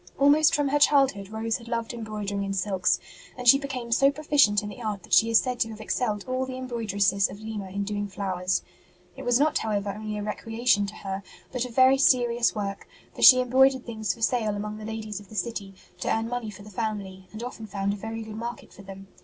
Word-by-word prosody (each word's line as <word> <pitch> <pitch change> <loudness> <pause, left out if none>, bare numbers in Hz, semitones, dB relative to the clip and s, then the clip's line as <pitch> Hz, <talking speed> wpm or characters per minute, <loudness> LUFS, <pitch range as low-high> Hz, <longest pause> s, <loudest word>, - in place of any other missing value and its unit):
Almost 295 +3 +5
from 290 -2 +1
her 290 +1 +2
childhood 270 -10 +3
Rose 220 +1 -2
had 235 - -14
loved 230 0 -3
embroidering 210 -3 -4
in 195 0 -3
silks, 190 -1 +1 0.4
and 250 -1 -5
she 275 +3 +8
became 255 -4 -5
so 275 +4 +5
proficient 280 -8 +3
in 205 - -5
the 210 +4 -10
art 210 -3 -4
that - - -8
she 225 - +6
is 230 - +5
said 250 0 0
to 225 - +1
have 220 -1 -9
excelled 215 -1 -2
all 255 0 -1
the 255 0 -6
embroidresses 205 -6 0
of 200 - -10
Lima 215 -3 -6
in 200 +2 -3
doing 205 0 -3
flowers. 185 -2 -2 0.5
It 270 - -9
was 245 -1 +2
not, 305 +2 +2
however, 205 -2 -2
only 215 +1 -5
a 205 - -4
recreation 225 0 0
to 210 - -8
her, 195 -1 -5 0.3
but 250 -1 -2
a - - -7
very 260 +2 +5
serious 240 -3 +3
work; 200 -1 -4 0.3
for - - -9
she 255 -1 +9
em 250 -1 -5
broidered 265 0 +4
things 220 -4 -2
for 225 - -6
sale 220 -3 +1
among 210 +1 -5
the 215 - -8
ladies 215 -2 -5
of 205 - -16
the 215 - -12
city, 205 -4 -4 0.2
to - - -1
earn 225 0 0
money 245 -2 -4
for 205 -1 -11
the 210 - -12
family, 195 -3 -4
and 220 +2 -7
often 230 -3 -7
found 200 0 -2
a - - -3
very 225 +2 -6
good 220 -1 -9
market 235 +1 -7
for - - -13
them. 195 0 -11
220 Hz, 235 wpm, -26 LUFS, 205-245 Hz, 0.5 s, she